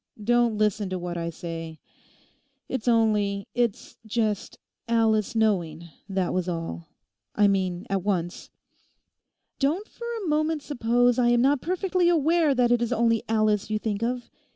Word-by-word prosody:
Don't 240 -1 +2
listen 210 -1 +1
to 185 - -2
what 175 -1 -5
I 170 -1 -3
say. 165 -1 -7 0.9
It's 260 -2 -4
only—it's 215 0 0
just 220 -2 -2 0.3
Alice 225 -1 +2
knowing, 170 -7 0 0.2
that 190 -2 -1
was 185 0 -1
all; 165 - -5 0.5
I 205 -1 +5
mean 185 -3 0
at 195 -1 -1
once.' 175 -3 -2 1.1
'Don't 320 +10 0
for 470 - -9
a 455 -5 -4
moment 310 0 0
suppose 245 -2 +2
I 240 - +3
am 240 0 +4
not 275 -1 +3
perfectly 365 0 +1
aware 325 -2 +3
that 245 -1 +3
it 240 -1 +3
is 235 - -1
only 230 -1 +2
Alice 215 -2 +1
you 215 - 0
think 210 -1 -3
of. 240 0 -3
220 Hz, 150 wpm, -26 LUFS, 195-245 Hz, 1.1 s, I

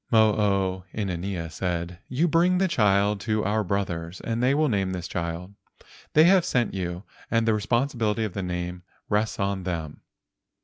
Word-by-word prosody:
" - - -38
Mo 110 -2 +6
o 95 -3 0
inanea 90 -3 -3
said: 85 +1 -3
"You 150 +7 +2
bring 175 +3 +3
the 190 +1 +3
child 105 - +2
to 110 0 -1
our 105 +2 +1
brothers 90 -3 -3
and 115 0 -2
they 130 +3 +3
will 155 +1 +3
name 100 -6 0
this 90 -1 -4
child. 85 +2 -4 0.6
They 155 - +7
have 185 +1 +6
sent 120 -7 0
you, 90 -1 -4 0.3
and 115 0 +1
the 110 - +4
responsibility 115 0 0
of 105 -4 -3
the 100 - -3
name 90 0 -4 0.3
rests 105 +1 0
on 100 -1 0
them." 80 -4 -4
100 Hz, 175 wpm, -26 LUFS, 90-115 Hz, 0.6 s, They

